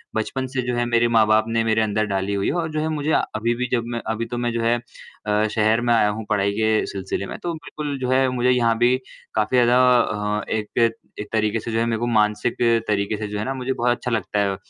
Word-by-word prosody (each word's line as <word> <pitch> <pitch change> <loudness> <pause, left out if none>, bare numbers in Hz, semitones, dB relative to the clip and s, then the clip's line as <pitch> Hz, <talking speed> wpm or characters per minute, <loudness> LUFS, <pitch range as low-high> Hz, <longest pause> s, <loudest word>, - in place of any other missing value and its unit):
बचपन 130 +4 -2
से 130 0 -2
जो 125 - 0
है 120 0 0
मेरे 120 0 +2
माँ-बाप 110 0 +4
ने 115 0 0
मेरे 110 0 +2
अंदर 110 0 0
डाली 100 -1 -2
हुई 100 -1 -1
है - - +1
और 170 -2 -1
जो 155 - -2
है 160 - -1
मुझे 155 0 -1
आ - - +4 0.2
अभी 115 +2 0
भी 125 +1 -2
जब 120 -2 +1
मैं 115 - -3
अभी 115 +1 -3
तो - - -1
मैं 120 0 -1
जो 115 - -1
है 115 +1 +3 0.5
अ, 105 +1 +2
शहर 110 +1 +2
में 120 0 +2
आया 105 -2 +4
हूँ 110 +1 -4
पढ़ाई 100 -1 +1
के 110 0 +2
सिलसिले 95 0 -4
में, - - -7
तो 175 - -3
बिल्कुल 150 -3 -5
जो 125 -1 -2
है 130 0 +3
मुझे 125 0 +1
यहाँ 120 -2 +2
भी 120 +2 +4 0.4
काफ़ी 110 +4 +1
ज़्यादा 125 0 +4 0.2
अ, 105 0 -2
एक 110 +2 +1 0.3
एक 105 - -5
तरीके 110 0 +1
से 115 - -6
जो 115 - 0
है 115 - +1
मेरे 115 -1 -1
को 120 - -1
मानसिक 105 0 +1 0.3
तरीके 105 0 0
से 105 - -4
जो 105 0 -4
है 105 - -2
ना 135 - -2
मुझे 130 0 -2
बहुत 120 -1 +1
अच्छा 125 - -4
लगता 105 -2 -1
है 100 -1 +1
115 Hz, 260 wpm, -22 LUFS, 105-125 Hz, 0.5 s, माँ-बाप